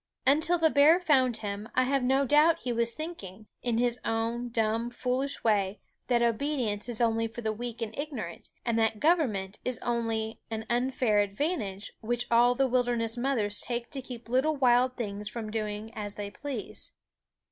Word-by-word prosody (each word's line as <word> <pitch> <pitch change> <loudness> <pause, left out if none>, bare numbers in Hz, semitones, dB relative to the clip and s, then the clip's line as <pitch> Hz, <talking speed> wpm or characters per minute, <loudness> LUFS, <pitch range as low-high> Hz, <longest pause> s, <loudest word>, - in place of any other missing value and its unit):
Until 310 +6 +4
the 320 -2 +3
bear 300 +5 +6
found 260 -9 +3
him, 205 0 -5
I 255 - +4
have 275 +1 +1
no 265 +2 +3
doubt 300 +5 +4
he 245 -1 -1
was 235 0 +1
thinking, 220 - -7 0.2
in 240 -2 0
his 240 0 +1
own 230 +2 -1
dumb, 230 0 0
foolish 255 +3 -2
way, 205 -2 +1 0.3
that 240 -2 +3
obedience 235 -3 0
is 240 -1 -1
only 225 -1 +2
for 230 +2 -8
the 220 -1 -1
weak 235 +1 -5
and 220 -1 -6
ignorant, 275 - -6 0.2
and 230 -1 +1
that 220 -1 +1
government 235 - +1
is 250 -2 -2
only 225 -2 -1
an 220 -1 -4
unfair 245 -3 +2
advantage 205 - -2
which 240 +2 -1
all 240 +1 +5
the 270 +1 +2
wilderness 240 -2 0
mothers 240 -5 0
take 235 -1 -2
to 275 - -4
keep 245 -2 -9
little 265 +6 +2
wild 255 -1 +3
things 210 -3 -4
from 215 -1 -6
doing 215 0 -4
as 205 -2 -5
they 205 -1 -5
please. 265 -1 -4
235 Hz, 175 wpm, -29 LUFS, 220-260 Hz, 0.3 s, bear